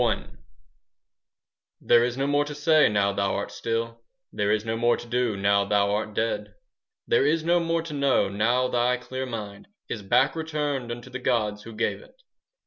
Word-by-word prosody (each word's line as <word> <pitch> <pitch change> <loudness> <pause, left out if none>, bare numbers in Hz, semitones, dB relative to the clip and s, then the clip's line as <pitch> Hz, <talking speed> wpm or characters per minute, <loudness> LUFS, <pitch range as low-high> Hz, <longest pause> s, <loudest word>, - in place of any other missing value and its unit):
LXI - - +1 1.5
There 120 0 +4
is 125 +1 -2
no 135 - 0
more 145 +1 +2
to 150 0 -7
say 155 +1 +4
now 100 -1 +1
thou 100 -1 0
art 100 - -3
still, 115 0 -3 0.3
There 105 0 0
is 110 0 0
no 110 0 -1
more 120 +1 +2
to - - -9
do 120 -3 -1
now 100 0 +3
thou 100 0 +1
art 105 0 -2
dead, 115 +1 -2 0.5
There 460 -2 +3
is 165 -1 +1
no 170 +1 +3
more 165 -1 0
to 165 -2 -7
know 140 -7 +2
now 120 +6 +1
thy 125 0 +1
clear 130 +1 -5
mind 105 -4 -7 0.2
Is 110 - -4
back 115 +9 +2
returned 150 -6 -2
unto 120 +2 -8
the 125 - -5
gods 110 -5 0
who 115 +1 -10
gave 110 - -1
it. - - -20
120 Hz, 190 wpm, -25 LUFS, 105-140 Hz, 1.5 s, There